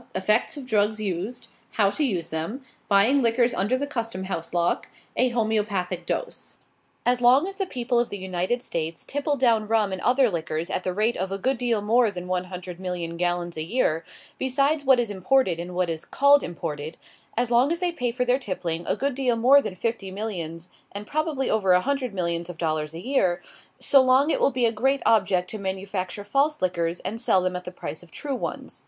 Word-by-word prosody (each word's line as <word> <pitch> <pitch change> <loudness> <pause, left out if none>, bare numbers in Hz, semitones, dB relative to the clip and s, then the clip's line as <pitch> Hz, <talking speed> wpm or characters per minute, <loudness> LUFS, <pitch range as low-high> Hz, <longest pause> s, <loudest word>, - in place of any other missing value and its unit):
EFFECTS 210 +10 +1
OF 275 - -7
DRUGS 215 -2 +1
USED. 205 +4 -4 0.3
HOW 200 -3 +3
TO 305 - -1
USE 180 - -1
THEM. 170 - -4 0.2
BUYING 220 +8 +5
LIQUORS 240 +1 +2
UNDER 225 +5 +1
THE 285 - -2
CUSTOM 230 -9 -4
HOUSE 170 -3 -4
LOCK. 175 0 0 0.3
A 255 - +3
HOMOEOPATHIC 205 -6 -1
DOSE. - - -4 0.5
As 245 0 +2
long 255 +6 +6
as 390 0 -6
the 390 -1 -1
people 245 -4 0
of 240 - 0
the 205 - -5
United 190 +6 -2
States 165 0 -4
tipple 285 +1 -1
down 230 -4 +2
rum 215 -2 +2
and 185 - -4
other 250 -2 +3
liquors 160 0 -3
at - - -2
the 185 - -1
rate 215 +5 +1
of 190 +1 -3
a 195 - -2
good 260 +5 -1
deal 235 -4 +1
more 230 +3 +3
than 180 -3 -6
one 185 0 -1
hundred 180 -1 -8
million 175 -3 -4
gallons 175 0 -1
a - - -2
year, 165 -3 0 0.4
besides 275 +3 +1
what 265 -2 +5
is 235 -3 -1
imported 190 -2 +2
and 175 +1 -6
what 180 0 +1
is 165 -1 -4
called 280 +1 +4
imported 160 -2 -5 0.4
as 240 0 0
long 245 +5 +4
as 335 - 0
they 360 -1 0
pay 245 -8 -2
for 250 +1 -1
their 250 +2 +2
tippling 175 -7 -3
a - - +1
good 280 +1 -1
deal 250 -2 +1
more 260 +5 +6
than 185 - -5
fifty 220 0 -3
millions, 180 -4 -5 0.2
and 200 +1 -6
probably 300 -1 -1
over 195 -4 +3
a 180 - +5
hundred 270 -1 -1
millions 170 -2 -1
of 175 - -7
dollars 155 -2 -2
a 170 - -8
year 190 -10 +2 0.4
so 275 - +5
long 260 +4 +4
it - - +1
will - - +4
be 250 -2 +1
a 230 - +3
great 265 +5 +1
object 190 -4 +3
to 215 - -5
manufacture 190 0 -4
false 280 +8 +1
liquors, 175 -2 -1
and 225 +3 -4
sell 190 -6 +3
them 185 0 -1
at 180 - -5
the 180 - -6
price 155 -4 -6
of 175 - -16
true 285 - -5
ones. - - -5
210 Hz, 215 wpm, -25 LUFS, 180-255 Hz, 0.5 s, long